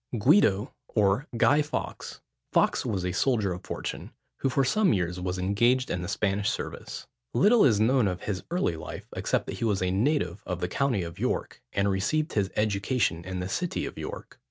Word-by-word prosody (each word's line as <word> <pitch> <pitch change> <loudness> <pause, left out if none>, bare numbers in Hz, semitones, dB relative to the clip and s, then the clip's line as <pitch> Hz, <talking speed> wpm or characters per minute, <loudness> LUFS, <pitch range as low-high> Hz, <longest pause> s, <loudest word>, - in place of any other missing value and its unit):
GUIDO, 110 - +4
OR 105 +7 +1
GUY 145 +5 +5
FAWKES. 150 0 -5 0.3
Fawkes - - +2
was 95 -4 -2
a 90 - 0
soldier 105 -1 +1
of 90 +2 -8
fortune, - - -5 0.3
who 135 - 0
for 135 +2 +2
some 190 +7 +3
years 90 -1 -1
was 90 0 -2
engaged 120 +8 +2
in 90 - -1
the 90 - -4
Spanish 100 0 0
service. - - -5 0.3
Little 215 +3 +5
is 110 -6 +4
known 120 +1 +3
of 90 -2 -3
his 95 -3 -2
early 170 - 0
life, 80 - -8
except - - 0
that - - -5
he - - -3
was 105 -4 +1
a 90 - +1
native 105 - 0
of 90 -2 -2
the 90 - -1
county 125 -2 0
of 85 -1 -8
York, - - -2
and 100 0 +1
received 105 +11 0
his 100 -3 +1
education 105 -3 0
in 90 +1 -4
the 90 - -3
city 175 - -2
of - - -6
York. - - -8
100 Hz, 195 wpm, -27 LUFS, 95-130 Hz, 0.3 s, GUY